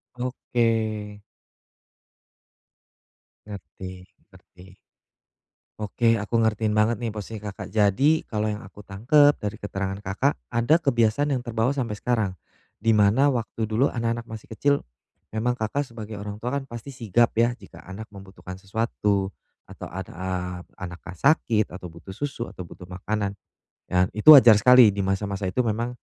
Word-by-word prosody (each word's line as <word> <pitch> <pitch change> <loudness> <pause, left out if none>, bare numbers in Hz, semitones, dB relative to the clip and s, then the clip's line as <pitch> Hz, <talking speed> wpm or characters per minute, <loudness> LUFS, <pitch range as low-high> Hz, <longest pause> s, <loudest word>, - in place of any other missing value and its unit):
Oke. 115 -4 -1 2.4
Ngerti, 95 -2 -9 0.3
ngerti. 95 -1 -18 1.1
Oke, 115 +3 +1
aku 115 +3 -1
ngertiin 110 -1 +1
banget 110 +1 +2
nih, 115 - -1
posisi 105 0 -7
Kakak. 105 -1 -7
Jadi, 115 +10 +3
kalau 105 -1 -1
yang 105 0 -3
aku 100 +1 -13
tangkap 145 +9 +4
dari 105 +1 -4
keterangan 95 -1 -4
Kakak 105 +9 -1 0.2
ada 120 +6 +3
kebiasaan 140 0 +1
yang 125 - -1
terbawa 120 +2 0
sampai 120 -7 -3
sekarang. 110 -5 0 0.5
Di 115 +2 +2
mana 105 +6 +4
waktu 115 -2 -3
dulu 110 +6 +1
anak-anak 115 -1 -2
masih 110 -1 -9
kecil, 140 +6 +2 0.6
memang 120 +3 0
Kakak 110 +6 -1
sebagai 110 -2 -8
orang 105 0 -6
tua 125 +3 -3
kan 140 -1 -1
pasti 120 +4 -8
sigap 120 -1 +1
ya, 115 +1 +3
jika - - -14
anak 95 +4 -9
membutuhkan 95 -1 -10
sesuatu 100 -2 -1 0.3
atau - - -9
an 95 +1 -6
a 95 +2 -5 0.5
anaknya 90 0 -8
sakit 115 - +2
atau 90 -1 -8
butuh 85 +3 -11
susu 140 -1 -4
atau - - -9
butuh 90 +1 -12
makanan, 100 +3 -3 0.5
dan 90 +1 +1
itu 110 +9 +9
wajar 120 -6 +8
sekali 125 0 +7
di 100 - -7
masa-masa 100 0 -2
itu 110 +7 0
memang 115 +2 -2
110 Hz, 145 wpm, -24 LUFS, 100-120 Hz, 2.4 s, itu